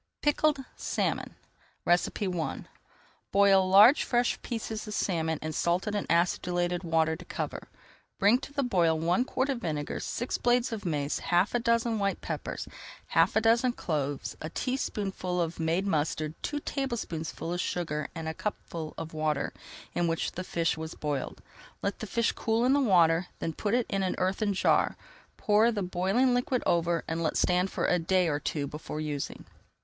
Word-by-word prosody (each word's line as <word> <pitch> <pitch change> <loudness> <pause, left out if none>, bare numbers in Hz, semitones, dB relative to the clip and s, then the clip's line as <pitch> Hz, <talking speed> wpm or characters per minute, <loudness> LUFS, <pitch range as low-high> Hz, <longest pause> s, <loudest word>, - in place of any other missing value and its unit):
PICKLED 295 -2 +2
SALMON - - -2 0.5
I 175 - +6 1.3
Boil 195 -1 +5
large 210 +9 +8
fresh 245 0 +1
pieces 225 -2 -4
of 210 - -4
salmon 160 -4 0
in 155 0 -3
salted 180 +7 0
and 205 - -2
acidulated 175 +1 +1
water 160 -1 +2
to - - -10
cover. - - -5 0.5
Bring 210 +5 +4
to 275 - -9
the 280 -1 -1
boil 170 -9 +2
one 170 +8 +2
quart 260 +1 -1
of 265 -3 -1
vinegar, 150 -6 -3
six 245 - -3
blades 245 +1 +2
of 210 -4 -4
mace, 145 -3 -1
half 175 +4 +2
a 245 - +2
dozen 230 -1 +1
white 200 -1 0
peppers, - - -5 0.4
half - - +3
a 220 - +4
dozen 235 +3 +3
cloves, 145 - -3
a 155 - -4
teaspoonful 195 -6 -2
of 170 -1 -2
made 165 +4 +1
mustard, 155 -3 0
two 295 - -2
tablespoonfuls 220 - -3
of 175 - -1
sugar, 150 -4 -2
and 160 -1 -5
a 160 - -2
cupful 165 -4 -5
of 160 0 -6
water 155 -2 -1 0.4
in 175 - +1
which 165 0 -1
the 185 - -5
fish 165 -2 0
was 160 0 -6
boiled. 145 -3 -3 0.4
Let 200 - -2
the 220 - -5
fish 235 +3 +1
cool 225 +2 0
in 260 - +4
the 285 - +4
water, 175 -6 +4
then 165 - -3
put 205 +7 0
it 245 -2 +2
in 195 - -1
an 185 - 0
earthen 195 +2 0
jar, - - +2 0.4
pour 215 +3 +4
the 205 -4 -2
boiling 190 +8 +2
liquid 245 0 0
over, 170 0 +2
and 165 +1 -2
let 160 - 0
stand 180 +1 +2
for - - -2
a 180 - +3
day 180 +2 +2
or 145 -2 0
two 145 -1 -2
before 150 +1 -6
using. 150 -2 -4
180 Hz, 175 wpm, -29 LUFS, 160-225 Hz, 1.3 s, large